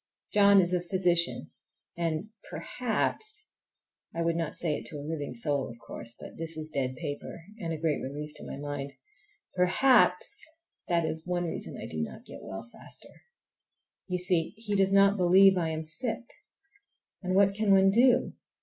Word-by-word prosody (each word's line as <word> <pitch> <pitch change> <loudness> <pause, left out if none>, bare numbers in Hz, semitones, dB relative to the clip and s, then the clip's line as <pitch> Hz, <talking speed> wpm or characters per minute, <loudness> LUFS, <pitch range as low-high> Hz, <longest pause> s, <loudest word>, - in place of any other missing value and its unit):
John 200 -1 +7
is 180 -1 +2
a 180 - +2
physician, 175 -1 +1 0.4
and 165 +3 -2 0.2
perhaps—(I 250 - -4
would 165 0 +1
not 165 -2 -2
say 165 -3 -1
it - - -5
to 160 - -8
a 145 - -7
living 150 -4 -4
soul, 140 +3 0
of 115 - -10
course, 115 0 -8
but - - -10
this 165 0 -5
is 155 0 -5
dead 130 -3 -2
paper 160 +2 -6 0.2
and 165 -4 -3
a 160 - -2
great 155 -1 0
relief 150 +3 -5
to - - -10
my - - -6
mind)—perhaps 145 - 0 0.4
that 170 -2 +2
is 160 +1 -4
one 175 0 0
reason 165 - -5
I - - -6
do 80 - -4
not 75 - -6
get - - -10
well 95 +4 -7
faster. - - -10 0.9
You 180 -1 -1
see, 180 0 +1
he 220 -2 -4
does 195 -1 +3
not 200 +1 +5
believe 190 +2 +6
I 170 -3 0
am 160 0 -3
sick! 225 +10 -2 1.0
And 185 -1 -1
what 200 0 +5
can 210 0 +1
one 195 0 +6
do? 245 +4 +4
170 Hz, 165 wpm, -29 LUFS, 150-195 Hz, 1.0 s, John